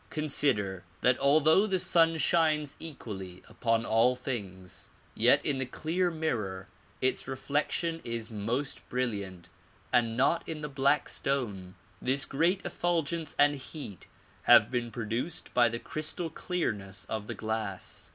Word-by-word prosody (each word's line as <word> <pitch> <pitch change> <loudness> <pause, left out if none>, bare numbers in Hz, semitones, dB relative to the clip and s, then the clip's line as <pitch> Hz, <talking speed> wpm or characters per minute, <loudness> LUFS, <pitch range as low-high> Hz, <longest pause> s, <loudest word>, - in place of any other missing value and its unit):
Consider 125 - +1 0.2
that 125 0 +3
although 155 +8 +5
the 190 -2 +1
sun 165 -2 +4
shines 155 -3 +2
equally 100 - -7
upon 115 -1 0
all 115 +3 +3
things, 100 -8 -6 0.2
yet - - +4
in 140 -2 +1
the 130 - 0
clear 170 +7 -1
mirror 115 - -3 0.3
its 130 0 +1
reflection 150 +5 -1
is 115 -1 -4
most 115 +6 -3
brilliant 100 -8 -3 0.4
and 115 -2 +2
not 140 +6 +3
in 155 -2 -3
the 150 - -4
black 135 0 +2
stone. 105 -10 -2 0.3
This 135 +2 +2
great 175 +7 +1
effulgence 170 -2 -1
and 145 0 +5
heat 135 - -8 0.4
have 105 - +8
been 120 -2 -1
produced 115 +7 -3
by 120 -1 +5
the 115 - -2
crystal 155 +5 -3
clearness 105 - -3
of 105 0 -4
the - - -4
glass. 110 -3 -4
130 Hz, 135 wpm, -30 LUFS, 110-155 Hz, 0.4 s, have